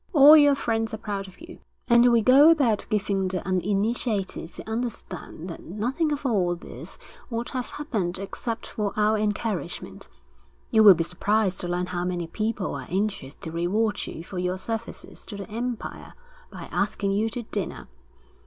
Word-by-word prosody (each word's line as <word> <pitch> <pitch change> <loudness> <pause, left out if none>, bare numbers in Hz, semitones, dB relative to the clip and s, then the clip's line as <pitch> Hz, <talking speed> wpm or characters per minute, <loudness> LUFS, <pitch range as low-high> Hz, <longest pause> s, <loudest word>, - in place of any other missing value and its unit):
All 295 0 +10
your 290 -2 +6
friends 225 -4 -1
are - - -7
proud 200 -2 -4
of 190 - -16
you, 340 +2 -11 0.3
and 240 0 +6
we 230 -2 +4
go 275 +6 +8
about 270 -10 +3
giving 195 -2 0
the 185 -1 -3
uninitiated 200 +1 0
to - - -10
understand 220 -7 -5
that 165 - -7
nothing 250 - -1
of 290 -1 -3
all 185 -8 +2
this 170 - -9 0.3
would 235 0 -3
have 255 -2 -3
happened 210 - -3
except 225 +4 -5
for 210 -2 -3
our 215 +1 +3
encouragement. 210 -4 -3 0.6
You 220 - +5
will 205 -3 +10
be 165 - 0
surprised 195 +2 0
to 175 - -3
learn 175 +1 -1
how 180 -1 -3
many 180 -1 -2
people 215 +3 -2
are - - -6
anxious 190 -8 -2
to 160 - -8
reward 205 +6 0
you 165 - -7
for 180 +1 -6
your 180 +1 -1
services 225 +3 -5
to 205 - -7
the 200 +1 -7
empire 235 +1 -5 0.4
by - - -8
asking 200 -1 0
you 210 +3 +1
to 240 +2 -5
dinner. 205 -4 -5
210 Hz, 170 wpm, -25 LUFS, 185-235 Hz, 0.6 s, All